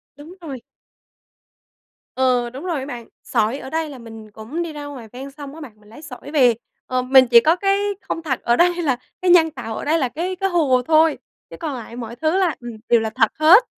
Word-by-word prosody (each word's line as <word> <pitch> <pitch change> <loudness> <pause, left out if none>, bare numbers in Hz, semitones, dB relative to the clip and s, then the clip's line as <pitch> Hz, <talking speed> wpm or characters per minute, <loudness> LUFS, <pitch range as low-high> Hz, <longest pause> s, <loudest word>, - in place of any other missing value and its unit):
Đúng 310 +6 -12
rồi. 270 -7 -7 1.5
Ờ, 250 -2 +2
đúng 265 +6 -9
rồi 335 -6 -1
á 265 - -5
bạn. 240 -5 -8 0.2
Sỏi 230 +2 0
ở 265 - -8
đây 320 0 -2
là 275 - -9
mình 225 -2 -11
cũng 225 +11 -6
đi 325 -2 -6
ra 295 -1 -7
ngoài 260 -6 -9
ven 270 +2 -8
sông 285 0 -10
á 320 - -10
bạn, 220 -7 -11
mình 210 0 -21
lấy 235 - -13
sỏi 290 -1 -10
về, 250 -5 +5 0.3
ờ, 255 0 -1
mình 260 0 +6
chỉ 235 -1 +8
có 320 +8 +3
cái 390 +1 +1 0.2
không 330 - -4
thật 265 -5 -1
ở 235 - +3
đây 350 +3 +3
là 265 -6 +1 0.2
cái 365 -1 +3
nhân 325 -3 +6
tạo 225 -5 -6
ở - - -5
đây 320 +2 +2
là 260 -3 0
cái 355 +7 -3
cái 390 +1 -1
hồ 285 -8 +2
thôi, 315 -1 +4 0.3
chứ - - -9
còn 315 -5 -3
lại 235 -1 -8
mọi 235 -1 -7
thứ 315 +7 0
là, 360 -5 +1
ừm, 240 -1 -7 0.2
đều 235 - +5
là 220 0 -2
thật 225 -1 +2
hết. 360 +10 +8
275 Hz, 240 wpm, -21 LUFS, 240-320 Hz, 1.5 s, chỉ